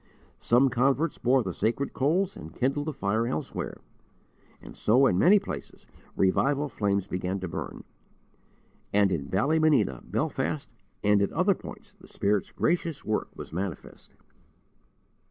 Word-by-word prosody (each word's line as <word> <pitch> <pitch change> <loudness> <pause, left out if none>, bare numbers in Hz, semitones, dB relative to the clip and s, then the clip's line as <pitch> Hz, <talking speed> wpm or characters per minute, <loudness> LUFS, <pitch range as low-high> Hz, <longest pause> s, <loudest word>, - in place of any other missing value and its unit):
Some 125 +3 +4
converts 135 +6 +1
bore 125 +1 +3
the 95 - -4
sacred 115 +9 -1
coals 170 +8 +1
and 80 +1 -10
kindled 140 +4 0
the - - 0
fire 115 -3 -1
elsewhere, 80 - -4 0.8
and - - -12
so 125 +6 +4
in 90 -8 +3
many 195 +5 +7
places - - -6 0.3
revival 140 +10 +2
flames 100 -5 0
began 90 0 -3
to 95 - -4
burn; - - -6 1.1
and 100 -1 +3
in 70 -6 -2
Ballymena, 140 - +2
Belfast, - - -2 0.3
and 105 0 +4
at 100 - +1
other 185 +5 +3
points - - -11
the - - -18
Spirit's 100 -1 0
gracious 165 -3 -1
work 110 - -1
was - - -9
manifest. 90 -1 -6
120 Hz, 135 wpm, -27 LUFS, 100-145 Hz, 1.1 s, many